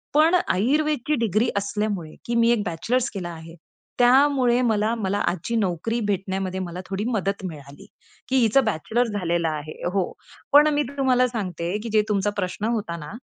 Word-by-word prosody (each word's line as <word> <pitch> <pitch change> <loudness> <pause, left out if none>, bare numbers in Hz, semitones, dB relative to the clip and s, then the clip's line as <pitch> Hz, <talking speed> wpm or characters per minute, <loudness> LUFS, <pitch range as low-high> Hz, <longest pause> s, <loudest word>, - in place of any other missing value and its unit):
पण 320 +4 +5
आयुर्वेदची 295 +7 +1
डिग्री 220 +3 +1
असल्यामुळे 200 -4 -2
की 235 - -2
मी 235 0 +4
एक 225 -3 +1
बॅचलर्स 235 +10 -1
केला 185 -4 -5
आहे 165 0 -10 0.4
त्यामुळे, 255 -1 +4
मला 220 -2 +1
मला 205 -2 -1
आजची 185 +7 -2
नोकरी 215 +2 -1
भेटण्यामध्ये 190 -1 -2
मला 180 0 -5
थोडी 195 +2 -2
मदत 200 -4 -1
मिळाली 145 +2 -9 0.4
की 260 - +1
हिचं, 245 +3 +4
बॅचलर्स 220 +5 0
झालेला 170 -2 0
आहे 150 +1 -7 0.2
हो. 195 -2 0 0.4
पण 295 +1 +8
मी 295 - +2
तुम्हाला 255 -2 +3
सांगते 185 -6 -3
की 235 - -5
जे 215 - +5
तुमचा 205 0 +1
प्रश्न 185 +2 -2
होता 170 -6 -4
ना, 150 -2 -8
205 Hz, 165 wpm, -24 LUFS, 180-240 Hz, 0.4 s, पण